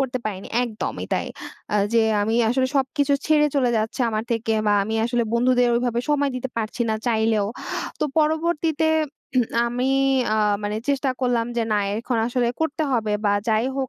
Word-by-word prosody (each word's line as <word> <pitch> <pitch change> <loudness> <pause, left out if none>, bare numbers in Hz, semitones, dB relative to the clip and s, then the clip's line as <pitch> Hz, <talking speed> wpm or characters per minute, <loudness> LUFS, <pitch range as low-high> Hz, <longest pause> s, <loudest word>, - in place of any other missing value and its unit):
করতে 255 -1 -1
পারিনি 195 -2 -5 0.2
একদমই 225 -3 -4
তাই। - - 0 0.5
আ - - +1 0.2
যে 230 - +4 0.2
আমি 220 +2 0
আসলে 260 +2 +2
সবকিছু 275 +2 +1
ছেড়ে 300 -1 +4
চলে 260 -4 +2
যাচ্ছে 220 +3 -2
আমার 215 0 -2
থেকে 225 -1 0
বা 210 - +4
আমি 220 +3 -3
আসলে 240 0 +1
বন্ধুদের 245 +1 +3
ওইভাবে 240 0 0
সময় 285 -1 +2
দিতে 255 +1 -4
পারছি 225 +2 -3
না - - +1
চাইলেও। 220 -3 +2 0.5
তো - - +2
পরবর্তীতে 315 0 +1 0.5
উম 250 - +4 0.2
আমি 245 +2 -1 0.5
আ - - +3 0.3
মানে 205 +1 -2
চেষ্টা 280 -1 +1
করলাম 245 -2 +1
যে 235 - +2
না - - +3 0.2
এখন 240 +1 -2
আসলে 245 0 0
করতে 320 0 -1
হবে 220 -4 0
বা 205 - +3 0.2
যাই 220 +1 +2
হোক 265 -1 -1
245 Hz, 175 wpm, -23 LUFS, 225-270 Hz, 0.5 s, যে